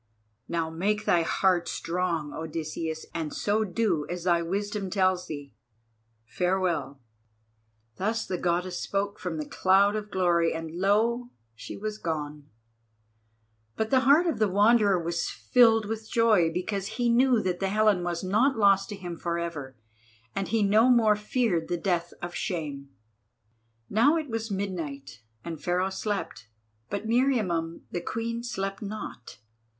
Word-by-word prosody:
Now 165 -1 -2
make 205 +6 -1
thy 170 - +4
heart 175 +1 +1
strong, 170 -4 -2
Odysseus, 160 0 -4
and 160 -3 -3
so 210 +2 0
do 185 -6 0
as 175 -1 -4
thy 170 -2 +3
wisdom 200 +3 -3
tells 185 -2 +1
thee. 145 -2 -7 0.7
Farewell!" 170 -3 -1 1.0
Thus 220 +4 -1
the 180 -2 -3
Goddess 175 +1 -1
spoke 200 +1 -2
from 180 -3 -4
the 155 - -3
cloud 195 +5 +3
of 210 -1 -4
glory, 170 -4 +2
and 160 -1 -5
lo! 220 +7 +1 0.2
she 110 - -8
was 215 +1 -5
gone. 150 -3 -4 1.3
But 220 0 -2
the 260 - +5
heart 285 +7 +5
of 330 -8 -1
the 215 -2 +3
Wanderer 205 0 +4
was 170 0 -2
filled 225 -3 +4
with 220 +1 -5
joy 215 -9 +3
because 195 +3 -3
he 245 -1 +1
knew 245 +1 +4
that 180 -1 -1
the 195 - 0
Helen 210 -3 +3
was 175 0 -3
not 220 +8 +2
lost 195 -2 +4
to 205 - -5
him 175 -3 -7
for 170 0 -2
ever, 150 -6 -5 0.6
and 195 - -1
he 225 -1 +1
no 215 +5 +5
more 225 -4 +5
feared 210 -5 0
the 175 - -1
death 175 -1 -1
of 175 0 -4
shame. 145 -7 -4 1.0
Now 260 +10 +4
it 305 -6 -4
was 225 0 -3
midnight, 165 - -5 0.2
and 165 -3 -6
Pharaoh 180 +2 0
slept. 190 - -4 0.4
But 205 +2 -3
Meriamun 215 -10 +1
the 175 - -3
Queen 230 +5 -3
slept 195 -5 -4
not. 205 - -7
190 Hz, 150 wpm, -27 LUFS, 170-215 Hz, 1.3 s, the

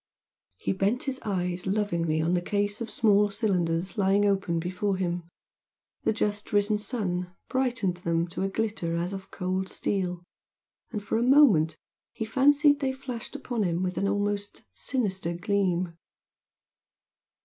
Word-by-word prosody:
He - - -1
bent 200 +6 +1
his 265 -2 -3
eyes 180 -3 -1
lovingly 170 -6 0
on 165 +2 +1
the 175 - +2
case 205 +3 -1
of 230 - -3
small 210 -2 +4
cylinders 185 -4 0
lying 200 +1 +4
open 195 -4 +1
before 185 +4 -1
him; 175 -2 -2 0.8
the - - +4
just 210 -1 -2
risen 205 +1 +2
sun 180 -6 -2
brightened 245 -9 0
them 170 -1 0
to 170 - -5
a 195 - +1
glitter 205 -5 -1
as 175 +3 -1
of 190 -1 -7
cold 185 0 -2
steel, 180 -3 -2 0.7
and 210 -4 -4
for 220 - 0
a - - 0
moment 235 - +5 0.4
he 220 - -3
fancied 285 +5 +4
they 270 -2 0
flashed 260 -1 -7
upon 245 -5 -3
him 175 -2 0
with 185 0 -1
an 200 - 0
almost 205 0 -1
sinister 190 -9 -1
gleam. 180 -2 0
200 Hz, 150 wpm, -27 LUFS, 180-220 Hz, 0.8 s, moment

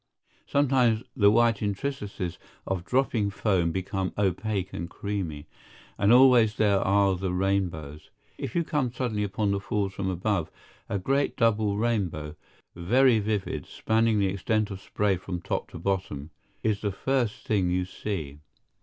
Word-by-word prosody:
Sometimes 125 -5 +2
the 100 -6 +5
white 115 0 +3
intricacies 105 -4 -3 0.3
of 95 -2 -2
dropping 120 -2 +1
foam 95 -4 +1
become 95 +1 -2
opaque 100 0 -1
and 85 +1 -5
creamy. 90 -8 -4 0.5
And 100 +1 +3
always 125 -3 +6
there 100 -2 +3
are 100 0 +3
the 95 0 -2
rainbows. 90 -6 -2 0.3
If - - -5
you 170 - +2
come 145 -6 -1
suddenly 115 -4 -2
upon 105 0 -1
the 100 - 0
Falls 100 -1 -2
from 95 -1 -2
above, 95 -2 -1 0.4
a 100 - 0
great 135 +9 0
double 110 -3 +2
rainbow, 95 -10 -1 0.4
very 115 +7 +4
vivid, 105 -1 -2
spanning 110 0 +1
the 100 -2 +2
extent 105 +2 0
of 95 -1 -7
spray 100 -2 0
from 90 0 -5
top - - -3
to - - -9
bottom, 85 -5 -3 0.3
is 105 -2 0
the 105 - -1
first 120 +2 -1
thing 95 -5 +1
you 90 +1 0
see. 80 -7 -5
100 Hz, 150 wpm, -27 LUFS, 95-110 Hz, 0.5 s, always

